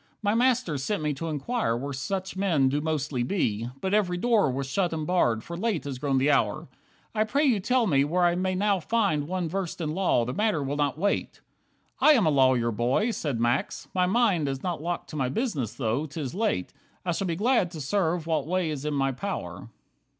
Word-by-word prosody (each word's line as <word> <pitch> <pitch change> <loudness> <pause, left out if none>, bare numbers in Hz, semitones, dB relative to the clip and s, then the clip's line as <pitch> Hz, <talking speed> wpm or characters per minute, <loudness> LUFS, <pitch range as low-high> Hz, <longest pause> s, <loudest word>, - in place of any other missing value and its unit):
My 205 0 +2
master 235 - +2
sent 155 +5 -2
me 150 -1 0
to 165 +4 -5
inquire 155 - -1
where 140 +3 -4
Such 190 +8 -3
men 170 -9 +2
do 145 +2 0
mostly 150 -4 -1
be, 120 - -1
but 190 +1 -1
every 185 -4 +2
door 220 - +3
Was 135 +1 -2
shut 175 +6 0
and 155 -1 -3
barred, 120 -11 +1
for 170 - -7
late 195 -2 -1
has 135 -3 -5
grown 135 -1 0
the 135 +3 +3
hour. 115 -7 +1 0.5
I 215 -1 +2
pray 280 +8 +1
you 245 -7 +3
tell 245 +4 +2
me 140 -8 +3
where 175 +5 +1
I 175 0 +4
may 185 +1 -1
now 200 0 +2
find 175 -6 0
One 180 -1 -2
versed 185 +1 -3
in 155 -2 -2
law, 175 -10 +2
the 125 - -3
matter 205 -7 +1
will 140 +1 -2
not 145 -1 0
wait." 200 +4 -1 0.6
"I 305 - +7
am 235 -8 +3
a 155 - +3
lawyer, 130 -4 +3
boy," 125 - +1
said 145 - -2
Max, 120 +3 -1
"my 180 -1 +2
mind 195 -7 +2
Is 135 -1 -4
not 175 -4 -2
locked 175 +1 -3
to - - -7
my 130 -4 0
business, 150 - -2
though 130 +5 -1
'tis 145 -2 -5
late. 190 - -1 0.3
I 175 - +1
shall 190 +3 -1
be 170 - -1
glad 220 -1 +2
to 170 -2 -8
serve 165 +2 0
what 155 -3 -1
way 180 -2 0
is 145 -1 -5
in 150 -1 -1
my 135 -1 +1
power. 120 - -5
160 Hz, 220 wpm, -27 LUFS, 135-195 Hz, 0.6 s, I